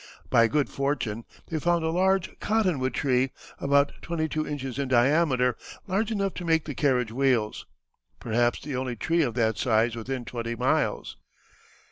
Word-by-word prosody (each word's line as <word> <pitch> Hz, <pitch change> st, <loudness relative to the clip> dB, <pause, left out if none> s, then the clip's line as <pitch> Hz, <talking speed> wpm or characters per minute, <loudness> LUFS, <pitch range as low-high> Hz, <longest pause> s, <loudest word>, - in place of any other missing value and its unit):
By 115 Hz, -1 st, +6 dB
good 145 Hz, +3 st, +1 dB
fortune 130 Hz, -6 st, -2 dB, 0.2 s
they 160 Hz, -, -2 dB
found 170 Hz, 0 st, +1 dB
a 160 Hz, -, 0 dB
large 190 Hz, +1 st, +1 dB
cottonwood 185 Hz, -12 st, 0 dB
tree, 130 Hz, -1 st, +2 dB, 0.3 s
about 140 Hz, 0 st, +3 dB
twenty 160 Hz, -2 st, -2 dB
two 155 Hz, 0 st, -2 dB
inches 135 Hz, -3 st, -4 dB
in 140 Hz, -, -1 dB
diameter, 130 Hz, 0 st, +3 dB, 0.3 s
large 200 Hz, +4 st, 0 dB
enough 200 Hz, -3 st, -1 dB
to -, -, -5 dB
make 160 Hz, -2 st, +2 dB
the 150 Hz, -, -4 dB
carriage 125 Hz, -5 st, +1 dB
wheels, 120 Hz, -4 st, 0 dB, 0.5 s
"perhaps 120 Hz, +1 st, +1 dB
the 145 Hz, -2 st, -5 dB
only 125 Hz, -1 st, -2 dB
tree 165 Hz, +8 st, +1 dB
of 120 Hz, -7 st, -1 dB
that 110 Hz, -3 st, +1 dB
size 115 Hz, -1 st, +2 dB
within 120 Hz, +2 st, -4 dB
twenty 115 Hz, -1 st, -4 dB
miles." 125 Hz, +3 st, 0 dB
135 Hz, 160 wpm, -26 LUFS, 120-160 Hz, 0.5 s, By